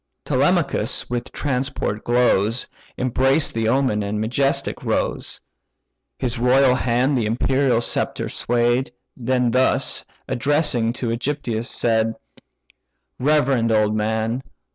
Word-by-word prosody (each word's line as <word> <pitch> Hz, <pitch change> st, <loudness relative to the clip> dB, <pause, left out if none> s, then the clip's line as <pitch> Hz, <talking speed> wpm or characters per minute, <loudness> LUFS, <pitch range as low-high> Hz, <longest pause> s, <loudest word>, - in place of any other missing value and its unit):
Telemachus -, -, +1 dB
with 120 Hz, -1 st, -3 dB
transport 130 Hz, -6 st, -2 dB
glows, 120 Hz, -2 st, +2 dB, 0.3 s
Embraced 135 Hz, +4 st, +2 dB
the 115 Hz, -1 st, -1 dB
omen, 130 Hz, -3 st, +1 dB
and 105 Hz, +1 st, -3 dB
majestic 135 Hz, +6 st, 0 dB
rose -, -, -2 dB, 0.8 s
(His 120 Hz, -2 st, -3 dB
royal 125 Hz, +2 st, +4 dB
hand 125 Hz, +2 st, +1 dB
the 115 Hz, -4 st, 0 dB
imperial 125 Hz, +2 st, +1 dB
sceptre -, -, -1 dB
sway'd); 120 Hz, +2 st, 0 dB, 0.2 s
Then 125 Hz, -1 st, 0 dB
thus, 130 Hz, +2 st, +1 dB, 0.2 s
addressing 125 Hz, -3 st, +1 dB
to 120 Hz, -1 st, -3 dB
AEgyptius, 120 Hz, -1 st, -2 dB
said: 115 Hz, -1 st, 0 dB, 1.0 s
"Reverend 135 Hz, -5 st, +2 dB
old 110 Hz, -1 st, +2 dB
man! 110 Hz, +3 st, -1 dB
120 Hz, 105 wpm, -21 LUFS, 115-130 Hz, 1.0 s, royal